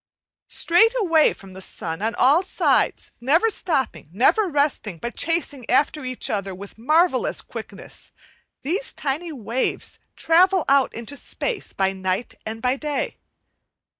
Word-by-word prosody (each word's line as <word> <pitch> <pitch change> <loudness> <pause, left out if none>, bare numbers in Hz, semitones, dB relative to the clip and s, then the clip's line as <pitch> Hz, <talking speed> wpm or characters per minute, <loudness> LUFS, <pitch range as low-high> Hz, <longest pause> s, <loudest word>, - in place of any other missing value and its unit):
Straight 450 +8 +3
away 330 -7 +4
from 195 -1 -12
the 190 - -9
sun 165 -2 -5
on 225 +2 -1
all 280 +7 +5
sides, 380 - +1
never 325 - +3
stopping, 265 - -2
never 265 - +3
resting, 285 - 0
but 235 +7 -6
chasing 305 -7 -1
after 295 +3 +2
each 255 -1 -3
other 195 -2 -2
with 200 +2 -10
marvellous 310 +3 +2
quickness, - - -9 0.5
these 375 - -2
tiny 305 +5 -3
waves 245 -2 -3 0.2
travel 360 +1 +4
out 275 -1 +4
into 235 +5 -5
space 435 - -4
by 195 0 0
night 190 +4 -2
and 225 +1 -6
by 255 +2 +2
day. 300 - -3
275 Hz, 135 wpm, -23 LUFS, 220-330 Hz, 0.5 s, all